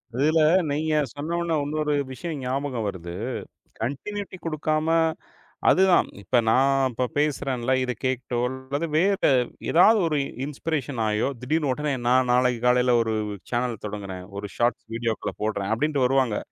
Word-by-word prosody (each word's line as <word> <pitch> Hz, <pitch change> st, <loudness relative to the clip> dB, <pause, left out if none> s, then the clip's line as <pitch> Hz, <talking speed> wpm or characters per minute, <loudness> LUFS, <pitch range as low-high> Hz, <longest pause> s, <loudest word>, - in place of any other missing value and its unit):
அதுல 155 Hz, +5 st, +3 dB, 0.3 s
நீங்கச் 150 Hz, -2 st, 0 dB
சொன்ன 155 Hz, +4 st, -3 dB
உடனே 170 Hz, -1 st, 0 dB
இன்னொரு 150 Hz, +1 st, -1 dB, 0.2 s
விஷயம் 150 Hz, +4 st, -5 dB
ஞாபகம் 130 Hz, -2 st, -2 dB
வருது. 85 Hz, -3 st, -6 dB, 0.7 s
கன்டியுனிடி 185 Hz, -, -4 dB
குடுக்காம, 155 Hz, -1 st, -1 dB, 0.8 s
அதுதான். 190 Hz, -1 st, +5 dB
இப்ப 125 Hz, -, +1 dB
நான் 135 Hz, +2 st, +3 dB
இப்ப 125 Hz, +2 st, -1 dB
பேசுறேன் 145 Hz, -3 st, 0 dB
இல்ல. 125 Hz, +3 st, 0 dB
இதக் 125 Hz, -4 st, -4 dB
கேட்டோ 130 Hz, -2 st, -1 dB
அல்லது 130 Hz, +5 st, -4 dB
வேற 195 Hz, +4 st, +3 dB, 0.5 s
ஏதாவது, 210 Hz, +6 st, +6 dB
ஒரு 155 Hz, -2 st, 0 dB, 0.3 s
இன்ஸ்பிரேஷன் 145 Hz, -3 st, -3 dB
ஆயோ, 105 Hz, +2 st, +1 dB
திடீர்னு 150 Hz, +3 st, 0 dB
உடனே 150 Hz, +1 st, -2 dB
நான் 125 Hz, 0 st, +3 dB
நாளைக்கு 125 Hz, -1 st, +2 dB
காலையில 125 Hz, 0 st, +4 dB
ஒரு 115 Hz, -1 st, -1 dB, 0.4 s
சானல் 120 Hz, -2 st, -1 dB
தொடங்கறேன், 100 Hz, -3 st, -6 dB
ஒரு 100 Hz, 0 st, -5 dB
ஷார்ட்ஸ் 120 Hz, +1 st, 0 dB
வீடியோக்கள்ல 115 Hz, -1 st, -2 dB
போடுறேன் 105 Hz, -2 st, -1 dB
அப்டிண்டு 145 Hz, +3 st, 0 dB
வருவாங்க. 130 Hz, -4 st, +2 dB
130 Hz, 140 wpm, -25 LUFS, 120-150 Hz, 0.8 s, ஏதாவது